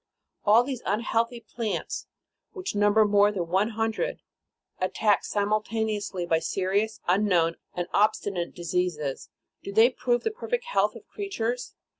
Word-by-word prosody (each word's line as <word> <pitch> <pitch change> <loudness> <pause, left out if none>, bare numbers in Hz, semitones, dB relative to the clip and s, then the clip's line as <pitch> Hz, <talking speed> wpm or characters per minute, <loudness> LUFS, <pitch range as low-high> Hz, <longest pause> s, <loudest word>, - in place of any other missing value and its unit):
All 220 +4 +6
these 255 -2 -4
unhealthy 230 +3 0
plants, 230 -2 -4 0.5
which 375 -1 -4
number 205 +1 +4
more 205 0 +4
than 175 -5 -3
one 190 +5 +2
hundred, 225 - -2 0.6
at 185 - -2
tacked 210 -2 +3
simultaneously 210 -2 -1
by 165 -1 +2
serious, 195 +6 -1
unknown 180 -3 +3 0.2
and 175 - -1
obstinate 200 -4 +1
diseases, 170 -5 -2 0.3
do 200 - -6
they 225 +5 +6
prove 245 -1 0
the 445 - 0
perfect 485 +2 -3
health - - +1
of - - -11
creatures 250 - -3
210 Hz, 135 wpm, -27 LUFS, 185-230 Hz, 0.6 s, All